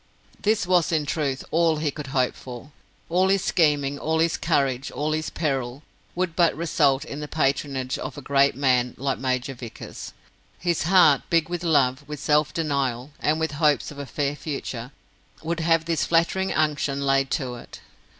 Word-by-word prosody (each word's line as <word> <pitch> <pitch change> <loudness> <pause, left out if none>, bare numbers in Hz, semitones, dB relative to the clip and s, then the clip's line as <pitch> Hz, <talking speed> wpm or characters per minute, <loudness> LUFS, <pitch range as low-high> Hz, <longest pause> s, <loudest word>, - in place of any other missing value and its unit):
This 210 -2 +1
was 175 -2 +2
in 155 -3 +1
truth 140 -3 -2
all 165 -1 +3
he 150 -1 -1
could 150 -1 -7
hope 130 -2 +1
for. 125 +3 -10 0.4
All 185 +3 +2
his 195 -1 +2
scheming, 145 -4 +2
all 160 +1 0
his 165 0 +2
courage, 135 -5 0
all 150 +1 -2
his 155 0 -1
peril, 135 -3 -2 0.3
would 180 -2 -1
but 170 -4 +3
result 150 -4 +2
in 145 -2 -7
the 150 - -5
patronage 135 -3 -1
of - - -6
a - - -6
great 140 0 +3
man 125 -2 +1
like 135 0 -2
Major 130 0 -1
Vickers. 120 -3 -9 0.4
His 170 -2 -1
heart, 170 -7 +6
big 165 -1 +2
with 175 0 -3
love, 140 -4 +2
with 150 -1 -5
self 150 +1 +2
denial, 140 -4 -2
and 155 +1 +1
with 160 -1 -1
hopes 150 -2 +2
of 145 - -10
a 140 - -6
fair 145 0 -2
future, 135 -5 -5 0.5
would 170 +1 -2
have 165 0 +2
this 165 -1 0
flattering 170 +3 +1
unction 145 -2 0
laid 135 0 +2
to 130 -5 -5
it. - - -12
150 Hz, 180 wpm, -24 LUFS, 135-165 Hz, 0.5 s, heart